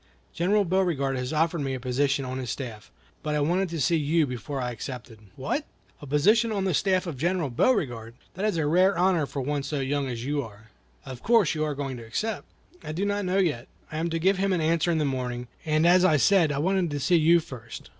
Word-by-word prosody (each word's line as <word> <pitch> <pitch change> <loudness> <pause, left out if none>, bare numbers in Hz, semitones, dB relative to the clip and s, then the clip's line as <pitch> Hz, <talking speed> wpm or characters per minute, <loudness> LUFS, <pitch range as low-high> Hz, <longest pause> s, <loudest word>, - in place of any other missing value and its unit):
General 200 +4 +2
Beauregard 170 -7 0
has 125 0 -3
offered 160 +1 +1
me 135 -1 -2
a - - -5
position 135 +2 0
on 130 +1 -4
his 125 -2 -5
staff, 110 -5 -6 0.3
but 150 -1 -2
I - - +1
wanted 175 +6 +1
to 165 -1 -4
see 165 +5 +2
you 155 +1 +2
before 125 +2 -5
I 125 -1 -2
accepted." 120 -1 -8 0.2
"What! 140 - -2 0.4
a 145 - -9
position 215 - +3
on 200 -2 -1
the 185 - +1
staff 185 +3 +1
of 165 -6 -5
General 170 -3 0
Beauregard! 120 - 0 0.2
That 190 - -5
is 210 -5 0
a 160 - 0
rare 180 +5 +3
honor 175 -4 +2
for 135 -1 -4
one 145 +1 -1
so 140 +1 -3
young 140 +1 -1
as 120 -1 -5
you 145 +1 0
are. 110 -2 -12 0.3
Of 125 -2 -8
course 225 -7 +3
you 155 -1 -1
are 150 -2 -2
going 135 -2 -4
to 115 - -9
accept?" 215 - -3 0.4
"I 155 - -5
do 185 +5 -1
not 205 -1 -1
know 185 +1 0
yet; 150 -11 0 0.2
I 155 - -3
am 170 +1 -1
to 165 - -1
give 190 +3 +2
him 195 0 +1
an 180 - +1
answer 165 +1 +1
in 165 - +2
the 155 - +1
morning, 125 -2 -3 0.2
as 170 +4 +4
I 160 -5 +5
said 165 - +4
I 140 - -2
wanted 185 +3 +1
to 145 -1 -3
see 170 +6 +3
you 165 +2 +5
first. 125 -8 -10
150 Hz, 235 wpm, -26 LUFS, 130-180 Hz, 0.4 s, I